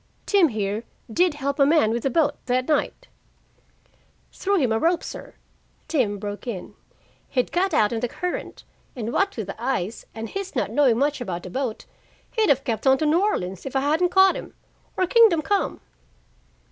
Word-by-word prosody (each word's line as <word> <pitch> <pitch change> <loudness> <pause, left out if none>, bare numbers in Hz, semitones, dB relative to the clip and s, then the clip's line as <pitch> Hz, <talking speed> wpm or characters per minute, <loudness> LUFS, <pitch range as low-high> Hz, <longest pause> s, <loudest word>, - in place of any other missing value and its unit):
Tim 395 -5 +4
here 215 -3 -2 0.3
did 350 0 +2
help 280 0 -3
a - - +7
man 300 -8 +4
with 235 +3 -1
a - - +1
boat 290 +2 +1
that 255 0 +1
night 320 +10 -1 0.6
" - - -37
"Threw 400 +1 0
him 260 -9 +1
a 220 - +2
rope, 340 +4 +1
sir," - - -8 0.5
Tim 255 -10 0
broke 205 +4 -6
in. 205 -7 -5 0.6
"He'd 250 -2 0
got 380 +2 +1
out 210 +1 +2
in 225 - -1
the 245 - -1
current, 360 +9 -5 0.3
and 235 -1 -4
what 395 -5 +1
with 220 - -3
the 200 +4 -8
ice, 230 -5 -2
and 225 0 -5
his 390 -1 -5
not - - -1
knowing 265 -6 +3
much 285 +1 0
about 180 -6 -4
a 180 - -7
boat, 260 -2 -3 0.5
he'd 440 -3 +1
have 270 -1 +3
kept 230 -1 -2
on 265 0 +6
to 310 - -1
New 315 +4 +3
Orleans 190 - -1
if 270 - -7
I 270 - +3
hadn't 315 +6 +2
caught 380 +1 +5
him - - -8 0.4
or 370 - +3
Kingdom 425 -6 +5
Come." 405 +3 -1
270 Hz, 195 wpm, -24 LUFS, 225-345 Hz, 0.6 s, a